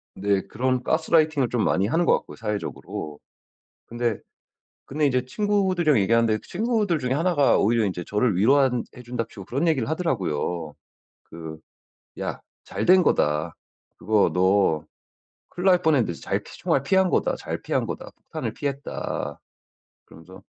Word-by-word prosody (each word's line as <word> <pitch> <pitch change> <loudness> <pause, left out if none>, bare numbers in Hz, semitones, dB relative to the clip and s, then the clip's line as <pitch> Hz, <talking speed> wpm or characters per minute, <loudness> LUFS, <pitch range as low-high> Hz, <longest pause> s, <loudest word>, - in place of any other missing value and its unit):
네. 100 0 +1
그런 130 0 -1
가스라이팅을 155 -3 +2
좀 120 -3 0
많이 95 +2 +1
하는 165 +9 +1
것 - - +4
같고요, - - -13
사회적으로. 105 -8 -5 0.7
근데, 120 -2 -2 0.7
근데 150 +2 -1
인제 125 -2 +1
친구들이랑 185 - +1
얘기하는데 110 +2 +2
친구들 210 -4 0
중에 125 -1 -1
하나가 155 -1 +3
오히려 115 +1 +2
인제 90 -3 -3
저를 105 0 +1
위로한 125 +4 +3
해 125 - -10
준답시고 115 -5 -5
그런 140 - -1
얘기를 140 -7 +1
하더라고요. 90 - -2 0.5
그 80 -1 -9 0.6
"야 - - -4 0.2
잘 - - -4
된 185 +1 +6
거다. 75 - +1 0.4
그거 105 +2 +2
너 90 -4 +2 0.7
큰일 180 +2 -4
날 180 -2 +5
뻔했는데 140 - +2
잘 - - -2
총알 135 - -1
피한 190 +5 +2
거다, - - +1
잘 - - -5
피한 - - 0
거다. - - -6
폭탄을 - - -6
피했다." 140 -1 -4 0.7
그러면서 95 +4 -14
125 Hz, 320 characters per minute, -24 LUFS, 100-160 Hz, 0.7 s, 된